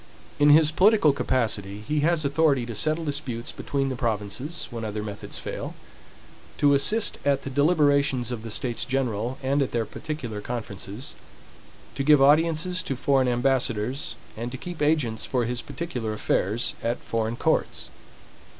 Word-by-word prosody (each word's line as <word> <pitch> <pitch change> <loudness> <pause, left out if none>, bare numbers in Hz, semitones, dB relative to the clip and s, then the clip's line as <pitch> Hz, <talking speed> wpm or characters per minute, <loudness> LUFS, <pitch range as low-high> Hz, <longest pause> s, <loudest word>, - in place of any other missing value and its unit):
In 145 0 +6
his 155 +1 +7
political 185 -3 +5
capacity 105 -7 -1
he 150 +8 -1
has 155 0 +2
authority 140 -3 +2
to 120 - -6
settle 155 +9 0
disputes 130 -5 -3
between 135 -1 -2
the 130 - -3
provinces, 115 - -3
when 115 -1 -5
other 105 -1 -3
methods 105 -1 -5
fail; - - -5 0.8
to 145 -1 +4
assist 205 +11 +2
at 140 -1 +1
the 135 - -5
deliberations 140 -4 +2
of 120 -3 -4
the 115 - -7
States 120 +2 -1
General, 125 -2 -1
and 140 +2 +1
at 135 - -1
their 115 -2 0
particular 120 -10 -6
conferences; 105 +1 -5 0.8
to 140 - -2
give 150 0 +6
audiences 160 +5 +3
to 135 - -3
foreign 135 0 +2
ambassadors, 125 0 0 0.2
and 115 +2 -5
to 130 - -5
keep 175 +4 -7
agents 145 -8 +1
for 125 -3 0
his 120 0 -2
particular 125 -11 -4
affairs 105 +1 0
at 120 +1 -1
foreign 115 0 -2
courts. - - 0
130 Hz, 155 wpm, -25 LUFS, 115-150 Hz, 0.8 s, his